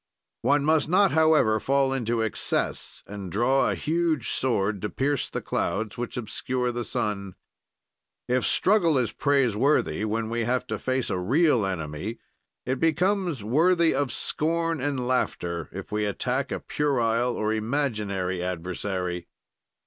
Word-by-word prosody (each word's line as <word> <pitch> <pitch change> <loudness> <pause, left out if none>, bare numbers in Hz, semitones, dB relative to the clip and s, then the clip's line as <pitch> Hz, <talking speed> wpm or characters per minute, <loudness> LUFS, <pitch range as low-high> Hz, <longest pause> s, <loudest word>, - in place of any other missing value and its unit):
"One 145 0 +2
must 155 -1 +3
not, 190 +2 +4
however, 155 -9 +4
fall 135 +1 +1
into 120 -3 0
excess 110 - -2
and 100 -3 -7
draw 125 +7 +2
a - - 0
huge 160 -5 0
sword 100 -6 0
to 105 - -2
pierce 140 +3 -1
the - - -4
clouds, 100 +4 -2
which 120 +1 -5
obscure 125 +2 -2
the 120 0 -3
sun. 100 -4 -3 0.9
"If 125 0 +1
struggle 180 -7 +3
is 125 -3 +1
praiseworthy 135 -4 +2
when 110 +1 -1
we 115 0 0
have 125 +1 0
to - - -3
face 130 -1 -1
a 90 - -1
real 125 - +3
enemy, 80 +4 -4 0.5
it 130 +1 -1
becomes 175 - +1
worthy 165 - +3
of 140 -4 0
scorn 165 +2 -1
and 135 -2 -1
laughter 85 -9 -1
if 95 +3 -8
we 105 0 0
attack 125 +6 -1
a - - -2
puerile 120 -4 0
or 110 0 0
imaginary 105 -7 -1
adversary. 90 0 -3
125 Hz, 140 wpm, -26 LUFS, 105-145 Hz, 0.9 s, not